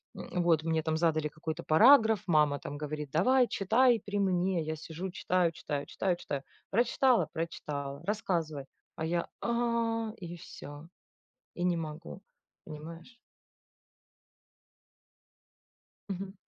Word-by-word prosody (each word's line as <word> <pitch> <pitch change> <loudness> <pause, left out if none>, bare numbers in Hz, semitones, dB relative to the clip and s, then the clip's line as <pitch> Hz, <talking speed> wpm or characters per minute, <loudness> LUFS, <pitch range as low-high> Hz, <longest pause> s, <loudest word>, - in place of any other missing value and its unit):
м, 180 -1 -3
вот 165 -3 +3
мне 160 -1 +1
там 160 -1 0
задали 155 -2 +2
какой-то 160 +2 -5
параграф, 220 - +6
мама 150 -3 +3
там 145 - -6
говорит: 150 -1 -5
"Давай! 250 +10 +4
Читай 230 +4 +3
при 205 0 -2
мне!" 185 -2 +1
Я 155 +1 -3
сижу 165 +4 -6
читаю, 180 -2 +1
читаю, 145 -3 -4
читаю, 185 -2 0
читаю. 140 -4 -4 0.3
"Прочитала? 235 - +3
Прочитала. 145 -3 -4
Рассказывай!" 165 -9 -1 0.3
А 160 - -3
я: 170 +1 -1
"А"- 230 -1 0
и 175 -2 -7
всё, 145 0 -10 0.7
и 175 - -3
не 180 -1 +2
могу. 165 +4 -7 0.4
Понимаешь? 165 +8 -10 3.0
Мгм. 190 0 -5
170 Hz, 120 wpm, -31 LUFS, 155-200 Hz, 3.0 s, параграф